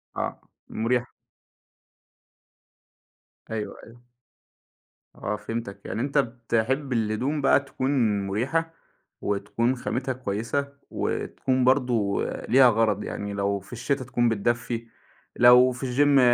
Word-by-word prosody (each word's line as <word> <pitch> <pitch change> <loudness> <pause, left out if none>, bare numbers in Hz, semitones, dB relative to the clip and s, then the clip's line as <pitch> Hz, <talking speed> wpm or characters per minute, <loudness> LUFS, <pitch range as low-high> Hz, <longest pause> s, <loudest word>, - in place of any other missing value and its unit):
آه. - - -3 0.3
مُريح. 120 +2 0 2.4
أيوه، 110 -2 -4
أيوه. 120 +1 -16 1.1
آه 105 - -3
فهمتك. 105 -1 -6
يعني 115 - -3
أنت 140 +2 -1
بتحب 125 +2 0
الهدوم 120 +6 0
بقى 135 - +5
تكون 135 -1 -3 0.4
مُريحة 135 +11 -1 0.5
وتكون 105 +5 0
خامتها 130 +1 -2
كويسة 125 +4 -3 0.2
وتكون 130 -1 -1
برضه 125 -6 +2 0.3
ليها 130 0 +7
غَرَض. 110 -3 +1
يعني 100 0 -5
لو 100 0 0
في 95 +6 -14
الشتا 130 +3 -1
تكون 120 -2 +1
بتدفّي، 115 +2 -1 0.5
لو 125 +1 +7
في 125 +2 -5
الgym 145 -1 +5
120 Hz, 105 wpm, -25 LUFS, 110-130 Hz, 2.4 s, ليها